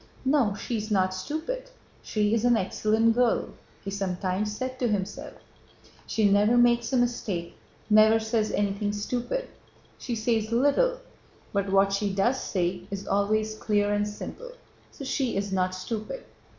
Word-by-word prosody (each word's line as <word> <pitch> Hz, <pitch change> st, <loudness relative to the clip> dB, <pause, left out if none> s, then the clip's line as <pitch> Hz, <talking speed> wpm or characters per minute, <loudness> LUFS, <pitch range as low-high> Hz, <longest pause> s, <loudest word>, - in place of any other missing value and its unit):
No, 260 Hz, -7 st, +3 dB
she 230 Hz, +2 st, -3 dB
is 215 Hz, +1 st, -4 dB
not 185 Hz, -3 st, +2 dB
stupid, 315 Hz, -, -4 dB, 0.3 s
she 210 Hz, 0 st, 0 dB
is 230 Hz, -1 st, +1 dB
an 240 Hz, -1 st, +4 dB
excellent 220 Hz, +3 st, +2 dB
girl," 245 Hz, 0 st, +2 dB, 0.4 s
he 195 Hz, -, -3 dB
sometimes 195 Hz, +1 st, -2 dB
said 255 Hz, 0 st, -4 dB
to 245 Hz, -, +1 dB
himself 205 Hz, -2 st, -3 dB, 0.7 s
"she 215 Hz, -2 st, +2 dB
never 205 Hz, +4 st, +4 dB
makes 240 Hz, 0 st, +3 dB
a 260 Hz, -, +2 dB
mistake, 220 Hz, -8 st, -1 dB, 0.3 s
never 215 Hz, +1 st, +6 dB
says 220 Hz, -1 st, 0 dB
anything 205 Hz, 0 st, 0 dB
stupid. 245 Hz, -, -2 dB, 0.5 s
She 240 Hz, -, -3 dB
says 220 Hz, -1 st, 0 dB
little, 285 Hz, -, +3 dB, 0.6 s
but 200 Hz, -1 st, 0 dB
what 195 Hz, 0 st, +4 dB
she 200 Hz, 0 st, 0 dB
does 220 Hz, +7 st, +1 dB
say 180 Hz, -1 st, -2 dB
is 200 Hz, 0 st, -6 dB
always 215 Hz, +2 st, +1 dB
clear 205 Hz, -1 st, +1 dB
and 205 Hz, 0 st, +1 dB
simple, -, -, -8 dB, 0.4 s
so -, -, -9 dB
she 265 Hz, -2 st, -1 dB
is 200 Hz, 0 st, -2 dB
not 185 Hz, 0 st, 0 dB
stupid. 220 Hz, -, -5 dB
215 Hz, 150 wpm, -27 LUFS, 200-240 Hz, 0.7 s, never